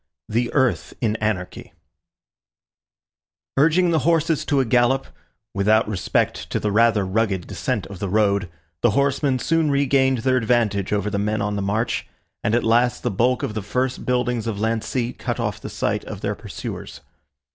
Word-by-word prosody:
THE 120 +2 0
EARTH 130 -4 +1
IN 110 -3 0
ANARCHY 105 -5 -3 1.8
Urging 165 +5 +4
the 160 - +3
horses 165 -1 +1
to 145 -3 +2
a 130 - +2
gallop, 120 +3 +2 0.5
without 105 +3 +3
respect 100 -4 -1
to - - -1
the 105 - -1
rather 110 -1 +3
rugged 95 -2 0
descent - - -2
of 100 -3 -9
the 100 -2 -3
road, 100 -2 +2 0.3
the 120 - +4
horsemen 140 -1 +2
soon 160 +4 +1
regained 135 -2 +3
their 130 -1 +3
advantage 110 -5 +1
over 105 0 0
the 100 - -1
men 105 +2 0
on 105 -1 -1
the 100 - -2
march, 105 +4 -1 0.4
and 110 - +2
at 120 - +1
last 120 +2 +2
the 120 - 0
bulk 120 +5 +1
of - - -2
the 110 - -3
first 125 +6 -2
buildings 125 -2 0
of 105 -3 -3
Lancy 115 +2 -1
cut - - -4
off - - -2
the - - -6
sight - - -1
of - - -7
their - - -1
pursuers. - - -7
115 Hz, 170 wpm, -22 LUFS, 105-130 Hz, 1.8 s, Urging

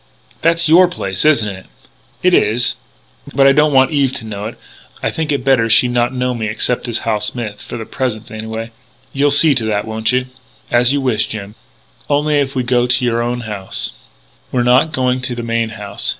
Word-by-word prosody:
"That's 165 0 +3
your 175 +4 +6
place, 95 - -3
isn't 140 -9 +3
it?" 95 -2 -7 0.6
"It 180 0 +4
is. 120 -3 +2 0.6
But 135 0 +4
I 135 - +7
don't 150 +2 +3
want 130 -1 +4
Eve 140 -3 +2
to 110 - -5
know 105 -1 -6
it.... 110 - -7 0.5
I - - 0
think 160 -1 -2
it 140 -3 -1
better 125 -4 +3
she 110 - +6
should 120 - -2
not 120 0 +1
know 125 -1 -1
me 110 -2 -3
except 120 +3 -1
as 120 -1 -1
Hal 110 -2 +1
Smith 105 0 -4
for - - -7
the 110 - -6
present, 115 -4 -4
anyway. 110 +1 -6 0.4
You'll 140 +1 +2
see 145 +1 +5
to 125 -4 -1
that, 105 -2 -1
won't 110 +1 -1
you?" 125 0 +1 0.5
"As 120 +1 +3
you 140 0 0
wish, 120 -5 0
Jim.... 105 -2 -7 0.6
Only, 145 +1 +2
if 140 -1 -2
we 130 - 0
go 120 0 +1
to 125 0 +2
your 115 -1 +1
own 120 +1 -2
house 105 -4 -4 0.3
" - - -35
"We're 125 - +1
not 125 +6 +3
going 130 -2 0
to 130 -1 -3
the 120 - -5
main 115 -1 -1
house. 105 -2 -5
120 Hz, 215 wpm, -16 LUFS, 110-135 Hz, 0.6 s, I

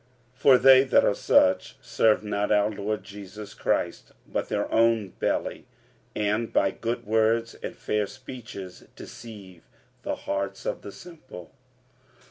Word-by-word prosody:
45:016:018 125 - -32
For 135 -2 +7
they 130 0 +7
that 135 - +3
are - - +3
such 95 - +2
serve 110 -1 +2
not 105 0 -1
our 105 0 +3
Lord 105 +1 -3
Jesus 100 0 -10
Christ, - - -2
but - - -3
their 105 -1 -1
own 115 -3 +3
belly; - - -3 0.5
and 105 +2 -1
by 95 - +2
good 115 +4 -4
words 110 +2 +1
and - - -6
fair 105 -1 -1
speeches 115 -8 -10
deceive 100 -7 -12 0.3
the - - -3
hearts 100 0 -4
of - - -3
the 100 - -9
simple. 155 - -12
105 Hz, 140 wpm, -26 LUFS, 100-115 Hz, 0.5 s, For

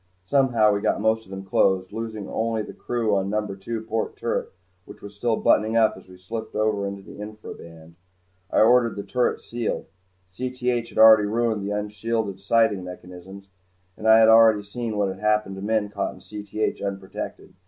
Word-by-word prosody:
Somehow 120 -4 +3
we 100 - -1
got - - +1
most 110 +1 +1
of - - -19
them 95 0 -7
closed, 95 0 +1
losing 110 -3 -5
only 110 -1 -1
the - - -9
crew 115 -4 -1
on 95 0 0
number 105 -1 -2
two 110 +3 -5
port 110 0 -3
turret - - -2 0.4
which - - -14
was 100 0 -9
still 115 +2 0
buttoning 110 +1 +2
up 110 -1 +4
as 95 0 -15
we 90 - -13
slipped 110 +5 -7
over 105 -2 0
into 100 0 -7
the - - -12
infra 105 +1 -8
band. 85 0 -14 0.6
I - - +3
ordered 115 +1 +4
the 100 - -5
turret 125 +2 0
sealed. 120 -1 -3 0.5
Cth 125 0 -2
had - - -13
already 110 -2 +8
ruined 110 -1 0
the 105 +1 -2
unshielded 105 -1 -3
sighting 105 -1 +2
mechanisms 90 +2 -11 0.5
and 110 - -4
I 110 0 +8
had 110 0 +6
already 110 -2 +6
seen 110 +1 -5
what 100 -2 0
happened 105 -2 +1
to - - -7
men 105 0 0
caught 100 -1 -3
in - - -15
Cth 105 +1 -4
unprotected. 95 -1 -6
105 Hz, 185 wpm, -24 LUFS, 100-115 Hz, 0.6 s, already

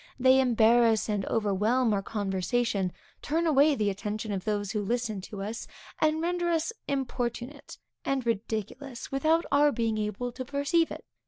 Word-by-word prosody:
They 260 +1 +6
embarrass 230 -2 +4
and 205 -2 -1
overwhelm 220 +3 +1
our 200 - +1
conversation, 200 0 -1 0.3
turn 325 +3 0
away 295 -1 +5
the 210 -4 +1
attention 210 +2 -4
of 190 -2 -3
those 205 -2 -1
who 210 - -1
listen 220 -1 -2
to 195 +1 -7
us, 220 +3 -5 0.3
and 310 0 +2
render 350 0 0
us 335 +6 0
importunate, 265 0 -3 0.3
and 270 -2 -1
ridiculous, 230 +3 -3
without 315 +5 +2
our 290 +1 +5
being 225 -4 -1
able 210 +4 -3
to 255 +2 -6
perceive 285 +5 +1
it. - - -8
235 Hz, 155 wpm, -28 LUFS, 210-280 Hz, 0.3 s, They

